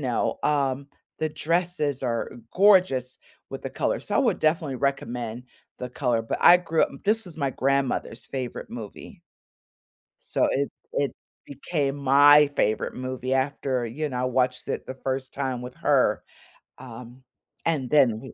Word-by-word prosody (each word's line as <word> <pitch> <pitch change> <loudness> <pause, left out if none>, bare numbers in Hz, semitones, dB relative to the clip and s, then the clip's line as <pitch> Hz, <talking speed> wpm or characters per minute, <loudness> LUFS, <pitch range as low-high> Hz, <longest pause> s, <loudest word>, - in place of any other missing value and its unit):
know? 125 -4 -1
Um, 140 -2 0 0.3
the 155 - 0
dresses 160 -3 -1
are 120 -3 -2 0.2
gorgeous 180 -11 +4 0.3
with - - -7
the - - -5
color. - - -1
So, - - -2
I - - +3
would - - +2
definitely 155 -3 +1
recommend 125 -3 -3 0.3
the 125 - -5
color, 125 -2 0
but 115 - -3
I 175 - +9
grew 165 -2 0
up - - +1
This 220 +2 +2
was 175 -4 -8
my 140 -3 -1
grandmother's 135 -3 -1
favorite 130 -2 -5
movie. 110 -4 -9 1.0
So, - - +1
it 140 +1 0 0.2
it 140 -1 0 0.3
became 140 0 -2
my 145 +2 +6
favorite 110 -4 0
movie 130 0 -3
after, 130 -1 -1
you 140 +7 -3
know, 125 -3 -4
I - - 0
watched 125 0 0
it - - -3
the 130 - -6
first 130 0 -4
time 130 -3 -2
with 125 0 -8
her. - - +2 0.6
Um, 125 0 -11 0.4
and 145 -7 0
then, 140 -3 +5
w 110 +5 -8
135 Hz, 155 wpm, -25 LUFS, 125-145 Hz, 1.0 s, I